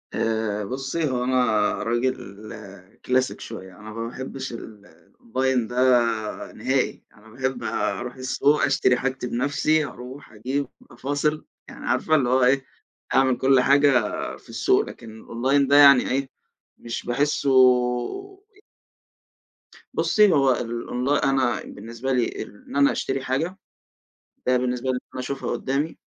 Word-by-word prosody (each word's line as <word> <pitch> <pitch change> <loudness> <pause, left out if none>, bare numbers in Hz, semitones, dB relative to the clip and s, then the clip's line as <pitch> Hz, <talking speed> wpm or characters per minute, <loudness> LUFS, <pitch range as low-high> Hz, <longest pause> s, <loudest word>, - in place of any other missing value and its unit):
آآ، 110 -2 -1
بُصّي 135 +4 -2
هو 125 -1 -1
أنا 130 0 +2 0.4
راجل 120 +3 0 0.9
كلاسيك 130 +1 0
شويّة 95 -4 -9
أنا 110 +1 -10
ما 115 +1 -4
باحبش 130 +1 -6
الأونلاين 115 +3 -4
ده 120 -3 +1
نهائي، - - -1
أنا 105 +1 -20
باحب 130 +2 -3
أروح 125 +1 -2
السوق 135 +3 +1
أشتري 125 - +3
حاجتي 130 -1 -2
بنفسي 145 +5 +1
أروح 130 +1 -10
أجيب 130 +6 -2 0.2
أفاصل، 145 +5 -2 0.2
يعني - - -10
عارفة 155 - +2
اللي 130 -5 +2
هو 130 0 +3
إيه 135 +1 +3 0.5
أعمل 130 -2 +3
كل 135 0 +4
حاجة 140 +2 +5 0.5
في - - -21
السوق - - +2
لكن 115 -2 -11
الأونلاين 135 +4 +1
ده 140 - +4
يعني 140 -3 +7
إيه 135 +1 -1 0.5
مش 115 0 -6
باحسه 140 +3 0 2.4
بصي 210 -3 +4
هو 135 -2 +4
ال 125 - 0
الأونلا 125 +5 0
أنا 130 -4 +1
بالنسبة 115 +4 -6
لي 125 -2 -1
إن 105 - -13
أنا 140 0 +5
أشتري 135 0 -2
حاجة 160 +9 -2 0.9
ده 125 0 +4
بالنسبة 125 +1 -1
لي - - +2
إن - - -4
أنا 130 - -4
أشوفها 135 +2 -4
قدّامي 140 +4 -2
130 Hz, 135 wpm, -24 LUFS, 120-140 Hz, 2.4 s, يعني